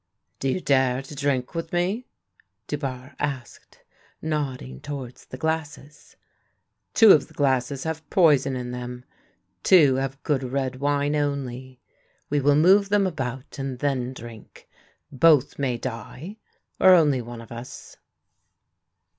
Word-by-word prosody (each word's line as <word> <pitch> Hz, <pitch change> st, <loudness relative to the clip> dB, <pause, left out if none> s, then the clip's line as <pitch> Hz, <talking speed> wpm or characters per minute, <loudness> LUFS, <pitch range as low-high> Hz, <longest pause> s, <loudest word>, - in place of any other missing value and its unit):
" -, -, -51 dB
Do 135 Hz, -, -1 dB
you 130 Hz, -, 0 dB
dare 130 Hz, -4 st, +2 dB
to 135 Hz, -, -11 dB
drink 140 Hz, -3 st, -1 dB
with 165 Hz, -1 st, -4 dB
me? 185 Hz, +8 st, -1 dB, 0.3 s
" 95 Hz, +4 st, -38 dB
Dubarre 135 Hz, -2 st, -5 dB
asked, 135 Hz, -4 st, -6 dB, 0.4 s
nodding 135 Hz, -, -3 dB
towards 135 Hz, -, -7 dB
the 130 Hz, -, -9 dB
glasses, 150 Hz, -1 st, -4 dB, 0.4 s
" -, -, -53 dB
Two 225 Hz, -3 st, +8 dB
of 150 Hz, -, +5 dB
the -, -, -20 dB
glasses 135 Hz, -1 st, 0 dB
have 160 Hz, 0 st, -5 dB
poison 150 Hz, -7 st, +4 dB
in 125 Hz, -1 st, -4 dB
them, 125 Hz, 0 st, -7 dB, 0.6 s
two 145 Hz, -8 st, +5 dB
have 135 Hz, +1 st, -4 dB
good 145 Hz, -3 st, 0 dB
red 130 Hz, 0 st, -2 dB
wine 145 Hz, +1 st, 0 dB
only. 130 Hz, -3 st, -3 dB, 0.5 s
We 145 Hz, -, +2 dB
will 145 Hz, +1 st, +3 dB
move 195 Hz, +6 st, +5 dB
them 205 Hz, -1 st, +3 dB
about 135 Hz, -7 st, -5 dB
and 135 Hz, -2 st, -4 dB
then 130 Hz, -2 st, -1 dB
drink. 120 Hz, -4 st, -12 dB, 0.4 s
Both 145 Hz, -1 st, +4 dB
may 130 Hz, -4 st, 0 dB
die, 130 Hz, -, -7 dB, 0.4 s
or 185 Hz, -1 st, +8 dB
only 145 Hz, -7 st, +3 dB
one 120 Hz, 0 st, -9 dB
of 115 Hz, -, -12 dB
us." 120 Hz, +1 st, -9 dB
135 Hz, 145 wpm, -24 LUFS, 125-150 Hz, 0.6 s, Two